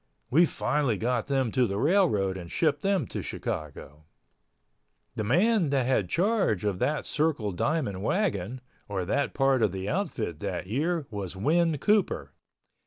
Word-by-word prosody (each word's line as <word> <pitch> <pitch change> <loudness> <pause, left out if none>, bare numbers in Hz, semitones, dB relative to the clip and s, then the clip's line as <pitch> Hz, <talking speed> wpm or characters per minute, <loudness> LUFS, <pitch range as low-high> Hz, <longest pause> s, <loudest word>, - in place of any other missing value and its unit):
We 165 +6 +5
finally 130 -6 0
got 120 +3 -1
them 135 -4 0
to 125 0 +2
the 100 - -3
railroad 135 - +2
and 90 -3 -8
shipped 150 -3 +1
them 195 +1 +1
to - - -5
Chicago. 75 0 -6 1.1
The 115 -3 -3
man 180 - +3
that 135 -3 +1
had 115 -8 +1
charge 195 - +1
of 100 -3 -1
that 150 +1 0
Circle 145 -9 0
Diamond 125 - -1
wagon, 125 - -1 0.3
or 95 -3 -2
that 140 +9 -1
part 135 -2 +3
of 105 - +3
the 95 +1 -5
outfit 115 - -2
that - - -3
year 150 - -1
was 100 -3 -5
Win 160 - +2
Cooper. 210 +7 +1
130 Hz, 155 wpm, -27 LUFS, 100-160 Hz, 1.1 s, We